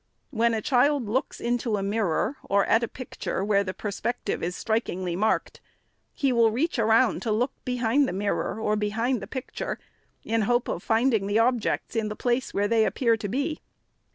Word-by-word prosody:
When 230 Hz, -2 st, +2 dB
a 215 Hz, -, -3 dB
child 275 Hz, -1 st, +2 dB
looks 255 Hz, +7 st, -1 dB
into 235 Hz, -2 st, 0 dB
a 195 Hz, -, -2 dB
mirror, 205 Hz, -, 0 dB
or 200 Hz, 0 st, +3 dB
at 225 Hz, -, +3 dB
a 235 Hz, -, -1 dB
picture 245 Hz, -6 st, -4 dB
where 200 Hz, -1 st, +3 dB
the 185 Hz, -1 st, -5 dB
perspective 215 Hz, +2 st, -3 dB
is 175 Hz, +2 st, -2 dB
strikingly 185 Hz, -6 st, -1 dB
marked, 215 Hz, +4 st, 0 dB, 0.5 s
he 275 Hz, -3 st, 0 dB
will 230 Hz, -2 st, +5 dB
reach 265 Hz, +5 st, -1 dB
around 225 Hz, +2 st, +3 dB
to 225 Hz, -, -1 dB
look 245 Hz, +5 st, +1 dB
behind 250 Hz, +2 st, +2 dB
the -, -, -2 dB
mirror, 200 Hz, +2 st, -2 dB
or 215 Hz, -1 st, +1 dB
behind 220 Hz, +3 st, 0 dB
the -, -, -7 dB
picture, 260 Hz, -, -5 dB, 0.5 s
in 225 Hz, 0 st, 0 dB
hope 240 Hz, 0 st, +2 dB
of -, -, -3 dB
finding 225 Hz, -2 st, +2 dB
the 205 Hz, +1 st, +1 dB
objects 235 Hz, 0 st, +1 dB
in 220 Hz, -1 st, 0 dB
the 210 Hz, -, -4 dB
place 245 Hz, +3 st, 0 dB
where 205 Hz, +1 st, +1 dB
they 225 Hz, 0 st, +3 dB
appear 230 Hz, 0 st, +2 dB
to 210 Hz, -, -4 dB
be. 285 Hz, -, -2 dB
225 Hz, 185 wpm, -26 LUFS, 210-245 Hz, 0.5 s, will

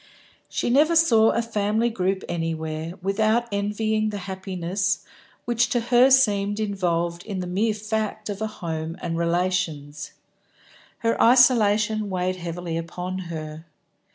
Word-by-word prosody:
She -, -, -1 dB
never 305 Hz, +6 st, +4 dB
saw 230 Hz, -9 st, +5 dB
a 235 Hz, -, 0 dB
family 220 Hz, +1 st, 0 dB
group 190 Hz, -2 st, -1 dB
anywhere 160 Hz, -1 st, -3 dB
without 215 Hz, +4 st, +1 dB
envying 215 Hz, +2 st, 0 dB
the 205 Hz, -, -4 dB
happiness 190 Hz, 0 st, -2 dB, 0.4 s
which 240 Hz, 0 st, +1 dB
to 240 Hz, -, +1 dB
her 245 Hz, +2 st, +4 dB
seemed 205 Hz, -6 st, +3 dB
involved 175 Hz, -5 st, -1 dB
in 205 Hz, -3 st, -5 dB
the 180 Hz, -, -3 dB
mere 205 Hz, +5 st, 0 dB
fact 215 Hz, 0 st, -3 dB
of 205 Hz, 0 st, -5 dB
a 220 Hz, -, 0 dB
home 165 Hz, -5 st, -5 dB
and 165 Hz, -, -3 dB
relations. 170 Hz, -4 st, -1 dB, 0.9 s
Her 230 Hz, -, +2 dB
isolation 220 Hz, -4 st, +4 dB
weighed 185 Hz, 0 st, -1 dB
heavily 170 Hz, -1 st, -4 dB
upon 180 Hz, +3 st, -5 dB
her. 155 Hz, 0 st, -7 dB
200 Hz, 130 wpm, -24 LUFS, 170-220 Hz, 0.9 s, saw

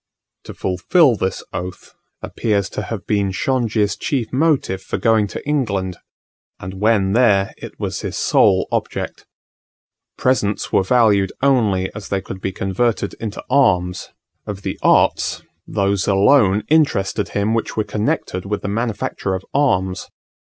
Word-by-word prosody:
To -, -, -9 dB
fulfil 125 Hz, -, +3 dB
this 95 Hz, -2 st, -3 dB
oath 90 Hz, +1 st, -6 dB, 0.3 s
appears 100 Hz, -4 st, -1 dB
to -, -, -4 dB
have 105 Hz, -1 st, -6 dB
been 100 Hz, -2 st, +1 dB
Shongi's 110 Hz, -1 st, 0 dB
chief 125 Hz, -6 st, -2 dB
motive 135 Hz, -, +1 dB
for -, -, -4 dB
going 110 Hz, -3 st, +2 dB
to 100 Hz, -, -8 dB
England; 100 Hz, -11 st, -1 dB, 0.6 s
and 95 Hz, +1 st, -8 dB
when 105 Hz, -3 st, +3 dB
there 105 Hz, -5 st, +3 dB
it -, -, -10 dB
was -, -, -3 dB
his -, -, -4 dB
sole -, -, +3 dB
object. -, -, -3 dB, 0.9 s
Presents 105 Hz, -5 st, 0 dB
were -, -, +5 dB
valued 100 Hz, -2 st, +3 dB
only 105 Hz, -9 st, +2 dB
as 105 Hz, -1 st, -8 dB
they 100 Hz, -, 0 dB
could 95 Hz, 0 st, -8 dB
be 95 Hz, -, -2 dB
converted 100 Hz, +2 st, -1 dB
into 110 Hz, -2 st, -6 dB
arms; 90 Hz, -10 st, +2 dB, 0.4 s
of 100 Hz, -1 st, -6 dB
the -, -, -4 dB
arts, -, -, +2 dB, 0.2 s
those 100 Hz, -1 st, 0 dB
alone 100 Hz, 0 st, +4 dB
interested 105 Hz, -10 st, +1 dB
him 100 Hz, +2 st, +1 dB
which 115 Hz, -1 st, -2 dB
were 110 Hz, -, +2 dB
connected 105 Hz, -3 st, -2 dB
with 105 Hz, +1 st, -3 dB
the -, -, -2 dB
manufacture 105 Hz, -3 st, -2 dB
of 95 Hz, -, -6 dB
arms. 95 Hz, -10 st, 0 dB
100 Hz, 145 wpm, -19 LUFS, 95-115 Hz, 0.9 s, were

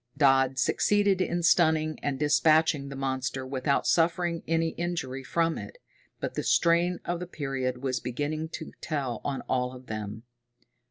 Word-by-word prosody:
Dodd 135 Hz, -2 st, +4 dB
succeeded 200 Hz, +6 st, +2 dB
in 175 Hz, -1 st, -1 dB
stunning 160 Hz, -2 st, +3 dB
and 140 Hz, -2 st, -1 dB
dispatching 150 Hz, 0 st, +3 dB
the 140 Hz, -, -7 dB
monster 130 Hz, -1 st, -2 dB
without 130 Hz, +1 st, 0 dB
suffering 170 Hz, 0 st, +2 dB
any 165 Hz, 0 st, +1 dB
injury 160 Hz, -6 st, -4 dB
from 165 Hz, +5 st, 0 dB
it, -, -, -9 dB, 0.4 s
but -, -, -3 dB
the -, -, -2 dB
strain 170 Hz, +1 st, +3 dB
of 175 Hz, 0 st, -2 dB
the 180 Hz, -, -5 dB
period 135 Hz, -5 st, -3 dB
was 130 Hz, -2 st, 0 dB
beginning 150 Hz, +6 st, -3 dB
to -, -, -6 dB
tell 135 Hz, -7 st, -3 dB
on 140 Hz, -2 st, -2 dB
all 125 Hz, 0 st, -1 dB
of 130 Hz, 0 st, -12 dB
them. 110 Hz, 0 st, -6 dB
145 Hz, 155 wpm, -28 LUFS, 130-165 Hz, 0.4 s, Dodd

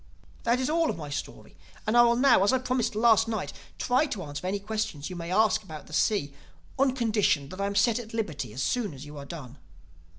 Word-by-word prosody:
"That 235 Hz, +2 st, +3 dB
is 260 Hz, -, 0 dB
all 325 Hz, +1 st, +2 dB
of -, -, -2 dB
my 150 Hz, -3 st, -7 dB
story 145 Hz, -, -6 dB, 0.3 s
and 215 Hz, +1 st, +1 dB
I 240 Hz, -, +8 dB
will 235 Hz, 0 st, +5 dB
now, 250 Hz, -5 st, +5 dB
as 200 Hz, -, +4 dB
I 260 Hz, -, +3 dB
promised 250 Hz, -3 st, -1 dB
last 225 Hz, 0 st, +4 dB
night, 220 Hz, -4 st, -3 dB, 0.2 s
try 255 Hz, +5 st, +2 dB
to 205 Hz, -9 st, -4 dB
answer 145 Hz, +4 st, -5 dB
any 195 Hz, +2 st, 0 dB
questions 210 Hz, -7 st, -4 dB
you -, -, -5 dB
may 170 Hz, 0 st, -5 dB
ask 215 Hz, +3 st, +3 dB
about 155 Hz, -7 st, -10 dB
the 155 Hz, -, -13 dB
sea, 150 Hz, -5 st, +1 dB, 0.5 s
on 265 Hz, -1 st, +3 dB
condition 210 Hz, -, +1 dB
that 185 Hz, +4 st, -6 dB
I 200 Hz, -, +1 dB
am 200 Hz, -, -4 dB
set 230 Hz, +2 st, +3 dB
at 225 Hz, -2 st, -9 dB
liberty 155 Hz, -, -3 dB
as 125 Hz, +5 st, -3 dB
soon 220 Hz, -, -1 dB
as 135 Hz, +2 st, -9 dB
you 150 Hz, 0 st, -10 dB
have 140 Hz, 0 st, -8 dB
done." 140 Hz, -5 st, -9 dB
210 Hz, 235 wpm, -28 LUFS, 155-235 Hz, 0.5 s, I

